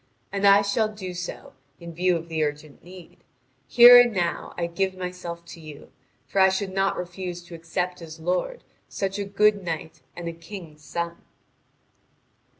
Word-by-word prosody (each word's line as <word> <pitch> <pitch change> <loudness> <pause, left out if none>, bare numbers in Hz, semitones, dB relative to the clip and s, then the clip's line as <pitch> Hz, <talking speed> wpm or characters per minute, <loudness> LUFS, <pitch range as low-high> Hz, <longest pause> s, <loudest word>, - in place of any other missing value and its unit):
And 200 0 +2
I 200 +1 +7
shall 210 +2 +1
do 190 -4 -7
so, 175 0 -7 0.3
in 170 -1 -9
view 180 +2 +2
of 165 0 -8
the 160 -2 -1
urgent 150 0 -5
need: 180 0 -13 0.5
here 245 +1 +10
and 240 -1 +2
now 175 -5 -2
I 170 - -1
give 190 +3 -2
myself 180 -2 -6
to - - -10
you; 155 -2 -12 0.3
for 195 - +1
I 190 - +7
should 190 0 -2
not 195 0 +1
refuse 180 0 -6
to 175 - -13
accept 180 +2 -3
as 160 -1 -10
lord, 180 - -2 0.2
such 195 0 -3
a 200 - -2
good 205 +1 +3
knight 160 -2 -5
and 175 -1 -6
a 170 - -3
king's 165 -3 -11
son." 170 +1 -4
180 Hz, 170 wpm, -25 LUFS, 170-195 Hz, 0.5 s, here